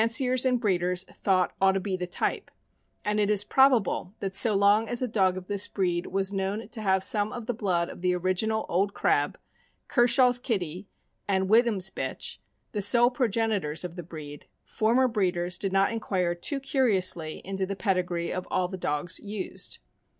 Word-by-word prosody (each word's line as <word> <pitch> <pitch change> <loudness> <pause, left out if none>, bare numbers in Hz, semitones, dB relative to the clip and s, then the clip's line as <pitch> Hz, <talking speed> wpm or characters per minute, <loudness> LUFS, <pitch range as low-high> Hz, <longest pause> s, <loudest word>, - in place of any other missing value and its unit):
443 230 +4 +2
ciers 255 0 +1
and 250 - +1
breeders 180 -4 0
thought 185 -1 0
ought 195 0 +5
to 195 - 0
be 190 0 -2
the 180 -1 -4
type; 175 - -2 0.6
and 210 0 0
it 205 -1 +2
is 205 -1 +2
probable 230 -6 +2
that 195 -1 -4
so 215 +1 +3
long 205 +3 +4
as 240 - 0
a - - 0
dog 190 -5 +2
of 185 - -7
this 200 +1 +2
breed 175 -3 -1
was 195 +1 -1
known 195 +3 -2
to 220 - -4
have 190 -2 +2
some 205 +1 +2
of 240 -2 -6
the 245 - -1
blood 185 -6 0
of - - -10
the 180 0 +1
original 185 +5 0
Old 195 +3 0
Crab, 145 0 +1 0.5
Kershaw's 245 0 +4
Kitty, 190 - -3 0.4
and 190 -1 +1
Whittam's 215 -4 +3
bitch - - -4 0.2
— - - -47
the 210 - -2
sole 240 +5 +4
progenitors 220 - -1
of 175 -1 -6
the 175 - -5
breed 150 -3 -10
— - - -49
former 240 +4 +2
breeders 180 -6 -1
did 195 - -2
not 195 +2 +3
inquire 185 -6 -1
too 225 - -2
curiously 195 - 0
into 190 0 -2
the 195 - -3
pedigree 180 -4 -1
of 185 0 -4
all 185 -1 +1
the 190 +1 -6
dogs 150 0 -2
used. 205 -2 -6
195 Hz, 190 wpm, -27 LUFS, 180-220 Hz, 0.6 s, ought